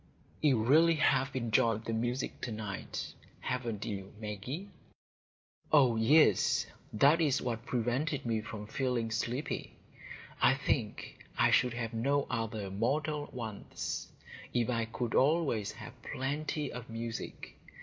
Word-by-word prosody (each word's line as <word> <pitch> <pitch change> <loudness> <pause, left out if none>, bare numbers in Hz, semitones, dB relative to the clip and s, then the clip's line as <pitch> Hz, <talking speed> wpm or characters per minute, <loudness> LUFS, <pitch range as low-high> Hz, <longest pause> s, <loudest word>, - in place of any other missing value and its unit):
"You 130 -8 +4
really 160 +7 +6
have 135 -3 +2
enjoyed 115 -2 +2
the 115 - -2
music 120 +3 -2
to 120 - -3
night, 105 -2 -5 0.3
haven't 115 -5 -3
you 100 -3 -5
Maggie?" 110 - -5 1.0
"Oh 135 -6 +6
yes, 110 - +5 0.3
that 140 +9 +5
is 145 -5 +3
what 115 -1 -3
prevented 130 +4 0
me 115 -2 0
from 105 -1 -7
feeling 120 0 -1
sleepy. 120 +5 -2 0.7
I 130 - +6
think 130 -5 -2
I - - +4
should 125 -1 +3
have 115 -1 -3
no 140 +5 +1
other 110 -3 -2
mortal 145 +8 0
wants, 110 -4 -5 0.4
if 120 0 +2
I 115 -1 0
could 115 +1 -3
always 135 -7 +2
have - - -9
plenty 145 +2 -2
of 125 -1 -7
music. 115 0 -6
120 Hz, 130 wpm, -32 LUFS, 110-140 Hz, 1.0 s, really